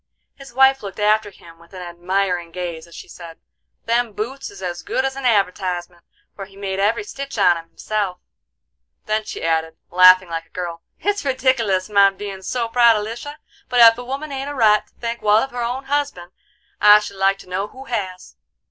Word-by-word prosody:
His 275 -2 -13
wife 265 +2 +4
looked 200 -2 -8
after 210 0 +2
him 165 -4 -17
with 170 +3 -17
an 180 - -7
admiring 175 0 -2
gaze 170 -2 -6
as 170 - -15
she - - -10
said: 165 -2 -11 0.5
"Them 235 -1 0
boots 260 +7 -5
is 405 - -13
as 175 -1 -4
good 260 - -1
as 265 0 -2
an 275 -1 -6
advertisement, 180 -5 0 0.3
for 195 - -7
he 195 0 -18
made 195 -1 -4
every 210 - +1
stitch 275 - -7
on 190 -4 +5
'em 165 0 -9
himself;" 200 0 -3 0.9
then 215 0 -1
she - - -7
added, 160 0 -1
laughing 185 0 +7
like 165 -1 -5
a - - -36
girl: 170 -2 -6 0.2
"It's 410 0 -1
redick'lus 255 -8 +1
my 200 -1 +5
bein' 195 0 -8
so 235 +4 -2
proud 235 -1 +5
of 210 - -2
Lisha, 240 +7 -7 0.3
but 245 -1 +1
ef 230 -1 +9
a 245 - -8
woman 275 +4 -5
ain't 275 +1 -4
a 290 - -6
right 215 -4 +3
to - - -32
think 235 0 -5
wal 210 0 +4
of 265 +5 0
her 245 0 -4
own 245 +3 -3
husband, 275 -11 -2 0.5
I 210 0 +9
should 205 -2 -8
like 195 +1 +2
to 195 - -15
know 190 +3 -2
who 260 +5 -12
has!" 190 -7 -5
210 Hz, 205 wpm, -20 LUFS, 180-245 Hz, 0.9 s, ef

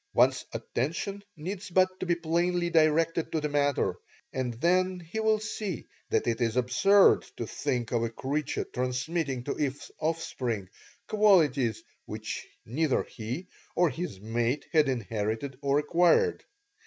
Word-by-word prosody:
One's - - +4
attention 170 +10 -3
needs 185 +5 -5
but 185 +1 +2
to 185 - -3
be 175 - +3
plainly 170 +1 0
directed 165 +1 +3
to 160 - +1
the 150 0 -2
matter, 145 -1 +1 0.4
and 130 -2 -1
then 180 +6 +2
he 175 +6 -6
will 220 0 +3
see 210 -4 -4 0.2
that - - +1
it 115 0 0
is 115 0 +1
absurd 190 +12 +5 0.2
to - - -3
think 120 -3 -2
of 120 -2 +1
a 115 - 0
creature 140 +5 -2
transmitting 130 +2 -2
to - - -2
his 140 -2 -3
offspring 125 - -2 0.4
qualities 150 - +3 0.2
which - - -5 0.2
neither 140 +4 +1
he 125 +10 -6 0.3
or 175 -3 +3
his 150 - -5
mate 115 +6 -1
had 155 -3 +4
inherited 115 +2 -2
or 140 0 +2
acquired. 175 - +3
150 Hz, 140 wpm, -29 LUFS, 125-175 Hz, 0.4 s, absurd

